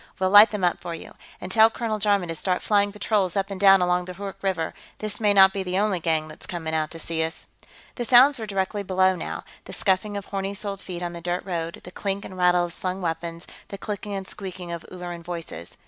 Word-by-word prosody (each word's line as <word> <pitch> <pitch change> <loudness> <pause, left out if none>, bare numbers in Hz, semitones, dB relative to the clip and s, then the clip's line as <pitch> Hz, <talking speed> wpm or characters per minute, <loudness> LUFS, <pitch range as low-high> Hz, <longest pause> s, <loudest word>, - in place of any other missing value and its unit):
We'll 185 0 +1
light 205 +2 +9
them 210 -3 -4
up 175 - +2
for 170 -1 -5
you. - - -11 0.3
And 180 - -7
tell 220 +2 +7
Colonel 225 -2 -3
Jarman 200 -4 +2
to - - -2
start 180 +3 -1
flying 205 -1 +2
patrols 205 -3 0
up 195 0 -1
and 195 - -5
down 195 -2 +7
along 180 0 +1
the 180 0 -8
Hoork 200 +1 -6
River; 185 -5 -1 0.2
this 215 -1 -1
may 210 -2 +3
not 190 -1 +7
be 195 - -2
the 185 0 -2
only 200 -2 +1
gang 160 -2 0
that's 155 - -12
coming 160 -3 -4
out 155 -1 0
to 165 - -8
see 165 0 -3
us." 160 +1 -5 0.5
The 245 - -4
sounds 255 +3 +6
were 220 - -5
directly 195 0 -1
below, 185 -1 +2
now - - -5 0.2
the - - -8
scuffing 205 +1 +1
of 200 - -6
horny 195 0 -3
soled 200 -1 -2
feet 180 -1 -6
on 175 0 -3
the 170 - -7
dirt 175 +1 -2
road, 170 -3 -4
the 180 - -10
clink 200 +1 -3
and 190 - -9
rattle 180 -1 +3
of 170 - -4
slung 185 +1 -3
weapons, 170 -1 -4 0.2
the 200 - -7
clicking 205 0 -5
and 190 -1 -5
squeeking 185 -3 -7
of 170 -1 -5
Ulleran 175 -1 -6
voices. 165 - -7
185 Hz, 240 wpm, -25 LUFS, 175-200 Hz, 0.5 s, light